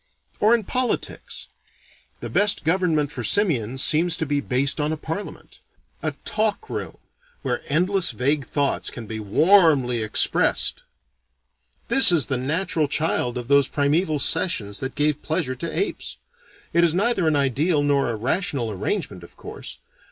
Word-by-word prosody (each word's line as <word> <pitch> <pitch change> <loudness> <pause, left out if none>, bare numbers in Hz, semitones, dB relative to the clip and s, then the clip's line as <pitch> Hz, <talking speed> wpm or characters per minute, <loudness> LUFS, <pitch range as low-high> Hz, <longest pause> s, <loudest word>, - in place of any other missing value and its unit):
Or 220 +3 +4
in 230 - -2
politics: 250 +5 -3 0.8
the - - -5
best 205 0 +2
government 160 -3 +1
for - - -5
simians 135 - +1
seems 165 +2 +3
to 160 - -2
be 145 -1 -1
based 135 +3 +1
on 150 +1 0
a 160 - -3
parliament: 160 +7 -7 0.4
a - - -2
talk 220 - -1
room, - - -5 0.5
where - - -2
endless 180 +5 +2
vague 135 +5 -1
thoughts 140 -1 -1
can 120 - -9
be 110 +1 -6
warmly 135 - +4
expressed. 110 0 0 1.1
This 270 -8 +7
is 160 -7 +3
the 130 - -2
natural 155 +4 -1
child 140 -5 -1
of 120 -1 -6
those 140 -1 +4
primeval 155 +3 0
sessions 105 - 0
that 130 0 -5
gave 150 0 0
pleasure 155 -5 -2
to 150 +6 -6
apes. 400 - -4 0.6
It 170 - +3
is 170 -1 +2
neither 200 -3 +1
an 155 - +2
ideal 145 +3 +1
nor 140 -3 +1
a 115 - -2
rational 130 - -2
arrangement, 100 - -4
of 85 - -15
course. - - -9
150 Hz, 150 wpm, -22 LUFS, 130-180 Hz, 1.1 s, This